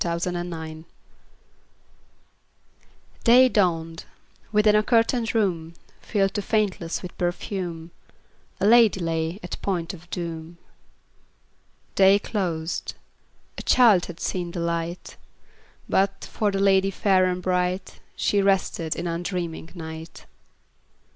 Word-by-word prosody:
Y 170 -1 -1
Z 180 +1 -2
History 175 0 -3
of - - -4
a - - -6
Life 160 -1 -7 2.4
DAY 250 +2 +7
dawned: 165 -6 0 0.5
within 210 0 +4
a 210 - +5
curtained 230 +1 +1
room, 170 -6 0 0.3
Filled 195 -3 0
to 205 - -1
faintness 200 -5 -1
with 180 - -8
perfume, 175 -2 -3 0.7
A - - +1
lady 225 -2 +6
lay 165 +1 -2
at 180 - -6
point 180 -4 -2
of 175 -1 -13
doom. 170 -1 -6 1.4
Day 195 +1 +6
closed; 175 -6 -3 0.6
a - - -4
child 220 -8 +5
had 175 -2 -9
seen 180 -2 -2
the 170 - -5
light; 170 +1 -3 0.7
But, 195 0 0
for 210 - -1
the 195 - -2
lady 195 0 +4
fair 190 -1 +2
and 180 0 -1
bright, 180 +1 -1 0.2
She 205 - +1
rested 190 -4 0
in 170 - -4
undreaming 170 -1 -4
night. 160 -1 -9
180 Hz, 125 wpm, -24 LUFS, 170-200 Hz, 2.4 s, DAY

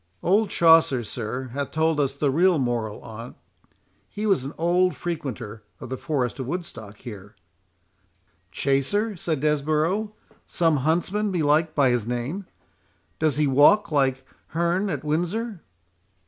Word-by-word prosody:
"Old 205 +4 +3
Chaucer, 160 -7 +5
sir, 125 +4 -5
hath 140 0 -3
told 160 -1 +1
us 140 -1 0
the 140 -1 +1
real 175 +4 +4
moral 120 -5 -2
on't—He 115 - -11
was 195 -11 +2
an 135 - -5
old 180 +2 +2
frequenter 125 -10 -5 0.2
of - - -8
the 130 - -2
forest 135 -5 -2
of 130 - -4
Woodstock, 130 - -6
here"— 105 -2 -10 1.2
"Chaser?" 145 - 0
said 160 -5 -2
Desborough; 155 +8 0 0.3
"some 165 -3 +2
huntsman, 175 +9 0
belike, 155 -2 +2
by 135 -4 +4
his 120 -3 -1
name. 125 +11 -3 0.7
Does 155 -3 +1
he 150 - +3
walk, 145 +9 +5
like 135 -2 +1 0.3
Hearne 170 +4 +1
at 145 -5 -3
Windsor?" 175 +7 -2
150 Hz, 135 wpm, -24 LUFS, 130-175 Hz, 1.2 s, Chaucer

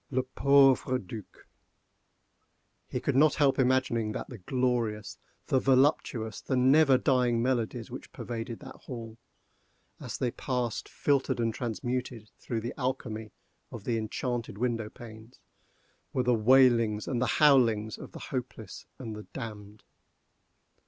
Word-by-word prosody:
Le 130 -1 0
pauvre 135 -1 +4
Duc! 105 -1 -10 1.4
He - - -3
could - - -1
not 150 +3 +5
help 140 -3 +2
imagining 125 -4 +1
that - - -5
the 120 - -9
glorious, 115 -1 -1 0.3
the 130 - +2
voluptuous, 130 -4 +1
the 130 - -1
never 135 +2 +5
dying 125 -3 +2
melodies 120 -2 -1
which - - -9
pervaded 115 -1 -6
that - - -10
hall, 115 -3 -9 0.8
as - - -6
they 125 - -1
passed 125 -3 -3
filtered 140 -4 0
and 115 -1 0
transmuted 120 -1 -4
through 115 -2 -3
the 120 - -4
alchemy 110 -4 -3 0.4
of 115 - -8
the 120 - -1
enchanted 115 0 -3
window 115 -2 -1
panes, 110 +1 -13 0.8
were 130 - +1
the 125 0 +3
wailings 115 -2 +4
and 125 -2 -1
the 125 - +2
howlings 115 -8 +4
of - - -9
the - - -9
hopeless 120 -5 -6
and 115 -4 -6
the 105 - -10
damned! 105 -2 -8
120 Hz, 135 wpm, -29 LUFS, 110-130 Hz, 1.4 s, not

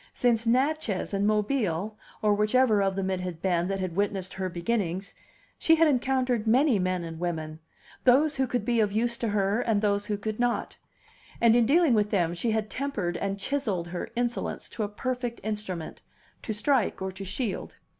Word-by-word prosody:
Since 235 -2 +2
Natchez 255 -4 +1
and 200 +1 +1
Mobile 210 -3 0 0.3
(or 210 -1 +4
whichever 215 +1 +3
of 195 -1 +1
them 190 -1 -1
it 185 - -1
had 180 -3 -5
been 175 -1 +1
that 195 0 -1
had 185 -3 -3
witnessed 195 -2 -1
her 190 -1 -3
beginnings) 185 +1 -2 0.5
she 325 - +5
had 325 0 +4
encountered 255 -4 +1
many 250 0 +4
men 185 -1 0
and 165 -1 -7
women, 160 -3 -3 0.4
those 280 +5 +5
who 265 -1 +1
could 245 -3 -2
be 240 -1 +1
of 210 -2 +2
use 235 +3 0
to 235 - -1
her 205 +1 +1
and 225 -4 +1
those 205 0 0
who 210 - -1
could 215 +2 -4
not; 245 -1 0 0.6
and 230 -1 +5
in 235 -2 +4
dealing 315 -1 +4
with 210 -2 +2
them 175 -5 +1
she 175 +7 -2
had 220 -1 0
tempered 210 -10 -3
and 195 0 -2
chiselled 200 -7 -2
her 175 0 -5
insolence 240 0 -2
to 230 - -6
a 205 - -1
perfect 245 +2 -3
instrument, 210 -6 -4 0.4
to - - -4
strike 230 +2 +1
or 190 0 -3
to 190 +1 -8
shield. 200 +3 -4
210 Hz, 190 wpm, -27 LUFS, 190-245 Hz, 0.6 s, she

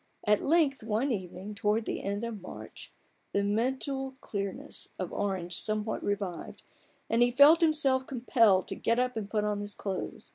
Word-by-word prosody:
At 210 -1 +3
length, 300 -3 +2
one 225 +5 0
evening 190 -1 -5
towards 210 +2 0
the - - -3
end 200 +2 -3
of 230 -4 -5
March, 185 - -10 0.4
the 200 - +2
mental 265 +5 -1
clearness 200 -2 -4
of 185 - -4
Orange 180 -4 -1
some 215 -1 -1
what 220 - -3
revived, 200 -4 -4 0.4
and 230 +1 +1
he 240 - +6
felt 285 +7 +7
himself 280 -5 +3
compelled 230 -6 +3
to - - -3
get 230 - 0
up 250 0 0
and 210 -3 -4
put 210 0 0
on 210 -1 -1
his 205 0 -6
clothes. 195 -2 -5
215 Hz, 175 wpm, -30 LUFS, 200-260 Hz, 0.4 s, felt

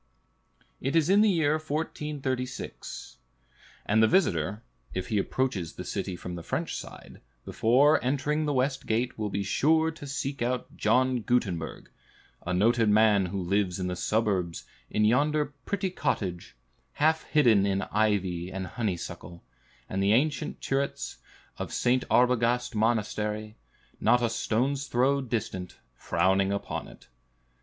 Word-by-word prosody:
It 135 +4 -1
is 165 +2 +3
in 200 +1 +6
the 215 - +5
year 155 -4 +2
1436; 145 - -4 0.7
and 110 +2 +3
the 110 - +6
visitor, 105 - +1 0.3
if 95 +2 -3
he 105 -3 +1
approaches 100 -8 -1
the - - -7
city 95 - -3
from 90 0 -7
the 85 - -6
French - - -3
side, - - -10 0.2
before 135 +7 +3
entering 145 +4 0
the 150 - 0
west 130 0 0
gate 115 +2 -1
will 105 -1 -1
be 100 +1 -2
sure 160 +10 +2
to 160 -3 -10
seek 135 0 -4
out 125 +1 -2
John 125 +3 +2
Gutenberg, 100 -9 -2 0.5
a 90 - -3
noted 110 +4 +3
man 105 -2 +4
who 95 +2 -3
lives 95 0 0
in 90 - -2
the 90 0 -2
suburbs 95 -4 -1 0.2
in 105 - +2
yonder 145 +6 +2
pretty 195 -2 -1
cottage, 100 - -2 0.4
half 160 +2 +2
hidden 115 -10 +4
in 100 0 0
ivy 95 -5 0
and 95 0 -4
honeysuckle, 90 -4 -5 0.4
and 95 - -2
the 100 +2 +3
ancient 145 +4 0
turrets 135 +1 -2 0.4
of - - -4
St. 125 +1 +1
Arbogast 125 0 +2
Monastery, 110 -1 -1 0.4
not 120 0 +3
a 115 - +1
stone's 130 +5 0
throw 135 +3 +2
distant, 110 -7 -4 0.2
frowning 95 +9 +1
upon 100 - -3
it. - - -16
115 Hz, 140 wpm, -28 LUFS, 100-140 Hz, 0.7 s, in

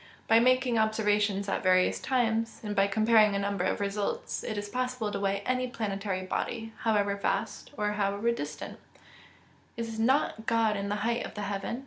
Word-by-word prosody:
By 225 - +6
making 255 -1 +3
observations 210 -2 +1
at 195 - -1
various 185 -1 +3
times, 230 -3 0
and 210 -1 -3
by 195 0 +4
comparing 215 0 +4
a - - +2
number 200 -2 -1
of - - 0
results, 200 0 -2
it 215 - -4
is 205 0 -3
possible 250 -1 -2
to 200 - -3
weigh 200 0 0
any 255 0 0
planetary 200 -5 -3
body, 225 +4 -3
however 205 -3 +1
vast, 200 - -2
or 210 0 0
however 205 +2 0
distant. 145 -9 -6 1.0
[Verse: 230 0 -3
"Is 220 0 -6
not 230 -2 +1
God 225 -2 +2
in 200 0 -3
the 205 +1 -2
height 235 0 0
of - - -8
the 210 - -4
heaven? 200 +4 -3
210 Hz, 180 wpm, -29 LUFS, 200-230 Hz, 1.0 s, By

